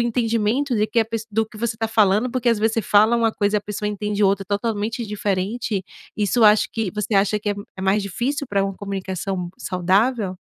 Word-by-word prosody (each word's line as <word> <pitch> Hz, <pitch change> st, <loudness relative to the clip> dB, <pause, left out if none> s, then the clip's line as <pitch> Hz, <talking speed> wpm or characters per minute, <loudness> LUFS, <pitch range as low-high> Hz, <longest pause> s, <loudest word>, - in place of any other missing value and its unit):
entendimento 235 Hz, +2 st, 0 dB
de 210 Hz, 0 st, +2 dB
que 235 Hz, -, -1 dB
a -, -, +2 dB
pesso 225 Hz, 0 st, -5 dB
do 220 Hz, +2 st, +1 dB
que 215 Hz, -, -15 dB
você 230 Hz, 0 st, -2 dB
tá 225 Hz, 0 st, -1 dB
falando. 215 Hz, +2 st, +3 dB
Porque 255 Hz, -1 st, 0 dB
às 230 Hz, -2 st, +3 dB
vezes 220 Hz, +1 st, +1 dB
você 225 Hz, -, 0 dB
fala 215 Hz, +4 st, +4 dB
uma 230 Hz, -1 st, +2 dB
coisa 205 Hz, 0 st, +1 dB
e -, -, +3 dB
a -, -, -9 dB
pessoa 210 Hz, 0 st, -4 dB
entende 210 Hz, 0 st, -2 dB
outra 195 Hz, 0 st, +2 dB
totalmente 215 Hz, +3 st, -2 dB
diferente. 205 Hz, 0 st, -2 dB, 0.3 s
Isso 210 Hz, +3 st, +1 dB
acho 210 Hz, 0 st, +5 dB
que 220 Hz, -5 st, -2 dB
você 210 Hz, +1 st, -2 dB
acha 200 Hz, +2 st, +3 dB
que 210 Hz, 0 st, -2 dB
é -, -, -1 dB, 0.2 s
é 190 Hz, -, -6 dB
mais 195 Hz, +2 st, +2 dB
difícil 255 Hz, +9 st, -2 dB
pra 200 Hz, -2 st, 0 dB
uma 195 Hz, -1 st, -3 dB
comunicação 190 Hz, -2 st, -4 dB
saudável? 190 Hz, +3 st, +1 dB
210 Hz, 215 wpm, -22 LUFS, 200-225 Hz, 0.3 s, acho